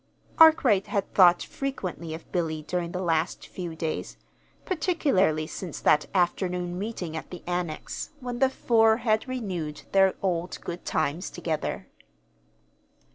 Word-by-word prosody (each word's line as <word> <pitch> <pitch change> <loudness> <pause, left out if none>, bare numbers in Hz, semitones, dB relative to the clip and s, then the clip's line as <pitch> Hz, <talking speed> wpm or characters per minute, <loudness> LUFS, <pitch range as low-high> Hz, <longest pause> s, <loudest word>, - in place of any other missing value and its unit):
Arkwright 270 -11 +6
had 200 -1 -2
thought 175 -2 +6
frequently 185 -12 -4
of 160 - -13
Billy 160 -4 -1
during 175 +1 -2
the 180 +1 -3
last 165 0 0
few 175 -3 -6
days, 160 -1 -4 0.5
particularly 280 - +1
since 175 0 -6
that 150 - +3
afternoon 180 0 0
meeting 190 -6 -4
at 160 - -6
the 180 - -9
Annex 175 -3 -3
when 245 -2 -5
the 265 0 +4
four 225 -4 +3
had 220 +1 +2
renewed 185 -12 -4
their 195 -1 +4
old 175 -2 -1
good 175 +1 -6
times 155 +3 -1
together. 165 -3 -3
180 Hz, 130 wpm, -27 LUFS, 165-215 Hz, 0.5 s, Arkwright